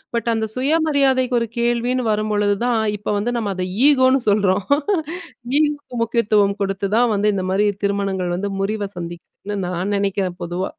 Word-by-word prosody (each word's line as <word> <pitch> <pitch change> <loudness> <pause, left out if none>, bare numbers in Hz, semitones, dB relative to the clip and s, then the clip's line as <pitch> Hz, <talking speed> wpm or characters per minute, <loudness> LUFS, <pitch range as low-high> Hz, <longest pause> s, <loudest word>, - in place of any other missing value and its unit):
But 235 0 -2
அந்த 220 0 0
சுயமரியாதைக்கு 270 -3 +2
ஒரு 230 - -1
கேள்வின்னு 240 +1 0
வரும்பொழுதுதான், 210 +2 +1 0.2
இப்ப 205 - -13
வந்து 240 +4 -1
நம்ம 210 -3 -2
அத 185 0 -2 0.2
ஈகோன்னு 260 -2 +4
சொல்றோம். 200 -2 +2 0.9
ஈகோக்கு 290 -5 -1
முக்கியத்துவம் 210 -3 +2
குடுத்து 195 0 -2
தான் 240 -1 +3
வந்து 205 +1 +2
இந்த 185 -1 -2
மாரி 205 +2 +2 0.2
திருமணங்கள் 195 -3 -1
வந்து 200 +2 -3
முறிவ 205 0 -2
சந்திக்குதுன்னு 175 +4 -7
நான் 180 +3 -2
நெனைக்கிறேன் 195 -2 -1
பொதுவா. 175 +2 -3
210 Hz, 145 wpm, -20 LUFS, 195-245 Hz, 0.9 s, ஈகோன்னு